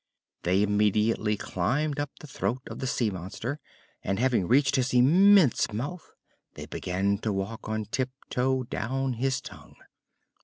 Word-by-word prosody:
They 95 +3 +2
immediately 105 +1 +2
climbed 140 +13 -1
up 145 0 -2
the - - -10
throat 125 -2 -3
of - - -8
the 130 - -2
sea 120 -4 0
monster, 100 - -5 0.4
and, 95 +1 -1
having 120 -6 +1
reached 135 +3 +3
his 130 -1 0
immense 170 - +5
mouth, 145 +11 -6 0.4
they - - -7
began 100 +2 -1
to 110 - -2
walk 100 +3 -4
on 110 -1 -2
tiptoe 130 +2 -2
down 130 +3 -2
his 130 +3 0
tongue. - - -12
120 Hz, 145 wpm, -27 LUFS, 105-135 Hz, 0.4 s, immense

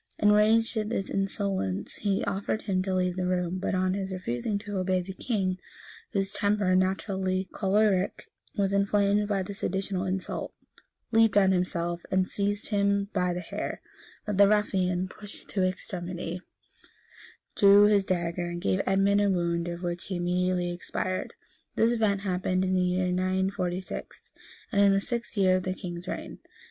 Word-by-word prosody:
Enraged 215 +3 +4
at 215 -1 -1
this 195 -4 -2
insolence, 195 - -2
he 200 -2 0
ordered 200 +2 -2
him 185 -3 0
to 190 0 -1
leave 180 -1 +1
the 185 -1 -1
room; 180 0 -1
but 190 - -1
on 185 0 +1
his 195 -1 -3
refusing 185 - -2
to 205 -1 -4
obey, 185 0 +1
the 185 +2 -6
king, 190 -4 -1 0.5
whose 195 -1 -1
temper, 205 -3 +1
naturally 190 0 0
choleric, 195 -1 +1 0.3
was 200 -1 +1
inflamed 200 +1 +2
by 200 -2 0
this 200 +3 -8
additional 190 0 -1
insult, 190 0 -3 0.6
leaped 225 -2 +4
on 200 - +7
him 190 - +4
himself, 175 -2 -1
and 185 0 +2
seized 205 +1 -2
him 200 -1 +1
by 180 -2 +1
the 175 0 -3
hair; 170 - -5 0.5
but 205 -2 -2
the 200 - +8
ruffian, 190 -3 +1
pushed 205 +2 -8
to 195 - +1
extremity, 180 -1 -3 1.1
drew 200 0 +7
his 205 -1 +4
dagger, 175 -1 -1
and 175 0 -4
gave 95 -1 +2
Edmund 195 +1 +3
a 205 - +3
wound 170 -2 0
of 175 +1 -5
which 175 0 -3
he 190 - -3
immediately 180 0 0
expired. 185 +1 -3 0.4
This 225 +1 +3
event 215 -4 +1
happened 185 -1 0
in 185 - 0
the 185 - +3
year 180 0 +1
946, 185 0 -2 0.4
and 200 -4 +3
in 200 -1 +6
the 195 - +3
sixth 235 +1 -4
year 185 -2 +4
of - - -2
the 185 0 -3
king's 175 -2 -7
reign. - - -5
190 Hz, 165 wpm, -28 LUFS, 180-200 Hz, 1.1 s, the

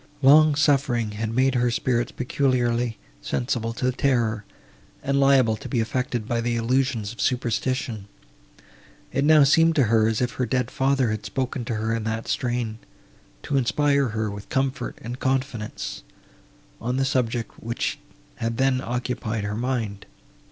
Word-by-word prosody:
Long 150 +2 +7
suffering 135 -6 +2
had 110 +1 -3
made 130 +3 +2
her 125 -1 +2
spirits 120 0 0
peculiarly 125 -3 0 0.2
sensible 120 -3 -2
to 125 +2 0
terror, 120 -5 0 0.6
and 140 0 +1
liable 135 -5 +4
to - - -9
be 125 - 0
affected 120 0 -2
by 120 0 0
the 120 0 -1
illusions 115 -2 0
of 120 - -7
superstition.—It 120 - -4
now 155 0 +6
seemed 165 +4 +4
to 145 - +4
her, 110 -1 +3
as 110 -1 0
if 125 0 0
her 125 +2 -2
dead 125 -2 -1
father 135 -3 +1
had 110 -1 -3
spoken 130 -2 -3
to 115 - -2
her 110 +1 -1
in 115 -1 -2
that 110 0 -3
strain, 120 -4 -2 0.6
to 140 - 0
inspire 140 +2 +2
her 110 -2 -2
with 100 0 -9
comfort 135 +1 -1
and 120 +2 -6
confidence, 130 -5 -2 0.8
on 125 +2 -1
the 135 - +2
subject, 120 -3 -1
which 115 +1 -2 0.4
had 115 0 -2
then 135 -1 +2
occupied 120 -3 -3
her 105 +1 -3
mind. 115 -4 -3
120 Hz, 150 wpm, -24 LUFS, 115-135 Hz, 0.8 s, Long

